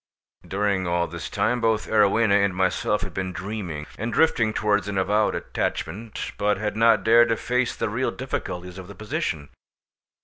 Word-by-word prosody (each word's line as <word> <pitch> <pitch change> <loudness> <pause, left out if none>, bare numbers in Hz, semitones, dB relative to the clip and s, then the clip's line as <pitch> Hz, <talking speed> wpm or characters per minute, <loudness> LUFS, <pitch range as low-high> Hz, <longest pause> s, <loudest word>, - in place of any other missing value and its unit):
During 100 -2 0
all 85 0 +1
this - - -7
time 120 +3 0
both 110 -1 +1
Arowhena 110 0 +3
and 100 -2 0
myself 95 +1 0
had 95 -2 -6
been 95 +1 -3
dreaming, 90 -5 -5
and 115 +3 -2
drifting 115 -5 +3
towards 105 -2 +1
an 100 -1 -3
avowed 105 +3 +2
attachment, 105 +7 -4
but 105 0 +2
had 105 +1 -3
not 115 -3 +4
dared 115 +2 +6
to 115 - +1
face 125 +1 0
the - - -2
real 120 +5 -1
difficulties 90 -8 -5
of 90 - -9
the 100 - -11
position. 80 -8 -3
105 Hz, 170 wpm, -24 LUFS, 95-110 Hz, -, dared